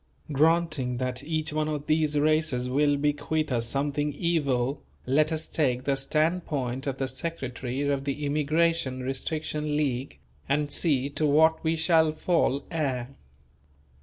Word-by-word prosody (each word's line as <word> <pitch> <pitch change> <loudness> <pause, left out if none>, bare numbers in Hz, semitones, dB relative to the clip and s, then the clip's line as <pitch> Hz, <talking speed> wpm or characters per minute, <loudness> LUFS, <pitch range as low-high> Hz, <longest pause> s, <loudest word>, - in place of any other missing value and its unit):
Granting 155 -4 +2
that 125 +1 -2
each 155 0 -2
one 155 0 0
of 150 -1 -3
these 155 -1 +1
races 155 -4 +1
will 145 +2 +2
bequeath 145 +1 -1
us 115 -2 +1
something 145 +3 -1
evil, 140 -5 0 0.2
let 155 +4 +2
us 160 0 -2
take 130 -5 0
the 140 0 +1
standpoint 145 -3 -1
of 135 -1 -2
the 135 - -1
secretary 130 -2 -4
of 140 -1 -1
the 145 +1 -2
Immigration 150 -2 +1
Restriction 150 +2 -2
League 135 -3 -2 0.3
and 145 +1 +1
see 140 -4 +2
to 155 +1 0
what 160 +2 +4
we 160 0 +1
shall 160 -1 +3
fall 155 -4 +1
heir. 130 -6 -2
145 Hz, 140 wpm, -27 LUFS, 135-155 Hz, 0.3 s, what